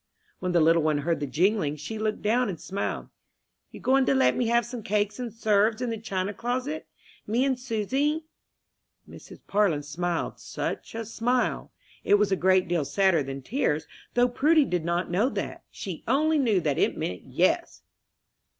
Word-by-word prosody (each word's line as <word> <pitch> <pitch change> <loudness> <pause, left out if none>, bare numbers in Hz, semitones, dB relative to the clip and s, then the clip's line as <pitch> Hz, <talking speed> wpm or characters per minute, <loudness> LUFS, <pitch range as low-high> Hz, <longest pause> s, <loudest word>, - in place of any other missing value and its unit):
When 180 - -2
the 175 - +3
little 165 +1 +5
one 155 -1 +2
heard 170 -3 +1
the 145 - -3
jingling, 165 - +1
she 155 +9 -6
looked 215 0 -2
down 235 +2 +2
and 175 -5 -5
smiled. 195 +1 -4 0.6
"You - - -11
goin' 270 +1 +3
to - - +3
let 265 - +4
me 245 - 0
have 235 0 +3
some 245 0 -6
cake 210 +1 -1
and 245 -2 -4
'serves 215 0 +2
in 250 -2 -2
the 225 - -4
china 195 -2 -2
closet, 255 +7 -3 0.4
me 240 +5 +2
and 260 -2 0
Susy?" 265 +6 -1 0.8
Mrs. - - -13
Parlin 195 -8 +1
smiled 170 +4 -3
such - - -5
a 225 0 -4
smile! 240 +3 -1 0.3
It 205 - +5
was 205 -1 +2
a - - +4
great 185 0 +3
deal 170 -3 +1
sadder 170 +3 +2
than 135 0 -6
tears, 195 - 0 0.3
though 245 0 +5
Prudy 300 +5 +3
did 180 -7 -1
not 170 +1 -1
know 205 +9 +2
that - - -5
she 185 -5 -7
only 305 +5 +3
knew 225 -8 +3
that 150 -4 0
it - - +1
meant 90 0 -3
"yes." - - 0
210 Hz, 180 wpm, -27 LUFS, 175-245 Hz, 0.8 s, little